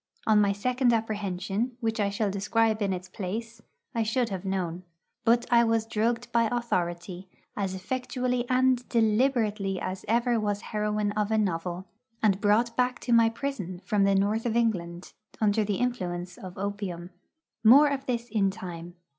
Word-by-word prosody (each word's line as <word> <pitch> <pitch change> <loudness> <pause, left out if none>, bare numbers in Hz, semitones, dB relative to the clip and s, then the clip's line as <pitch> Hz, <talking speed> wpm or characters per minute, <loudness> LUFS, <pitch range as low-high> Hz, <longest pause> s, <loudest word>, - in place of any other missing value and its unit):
On 215 -1 +5
my 200 -1 +3
second 250 +5 +1
apprehension, 210 +1 -2
which 225 -1 -1
I 200 -1 +2
shall 200 0 -1
describe 215 +2 +1
in 200 -1 +1
its 180 0 -4
place, 225 +4 -5 0.3
I 230 - 0
should 225 +2 0
have 190 -2 -4
known. 185 -3 -2 0.4
But 235 +1 +4
I 235 0 +6
was 225 -1 +1
drugged 230 +2 -1
by 235 -1 +3
authority, 180 -5 -2 0.3
as 195 -2 -2
effectually 250 +4 -2
and 255 -1 +2
deliberately 220 -4 +1
as 185 +1 -4
ever 235 +1 +2
was 205 -1 -1
heroine 210 -1 -1
of 210 0 -1
a 220 - +2
novel, 180 -2 -1 0.4
and 200 -2 +3
brought 225 +3 +2
back 250 0 +1
to 240 - 0
my 230 -1 +6
prison 220 -8 -4
from 210 -3 +2
the 195 0 +3
North 210 +4 +1
of 230 - -1
England 180 -7 -1 0.3
under 215 0 +2
the 205 -1 -1
influence 180 -7 -2
of 185 -1 -10
opium. 190 -3 -4 0.5
More 270 +7 +8
of 275 0 -3
this 240 -1 -2
in 205 -4 +1
time. 175 -4 -8
215 Hz, 165 wpm, -27 LUFS, 195-235 Hz, 0.5 s, More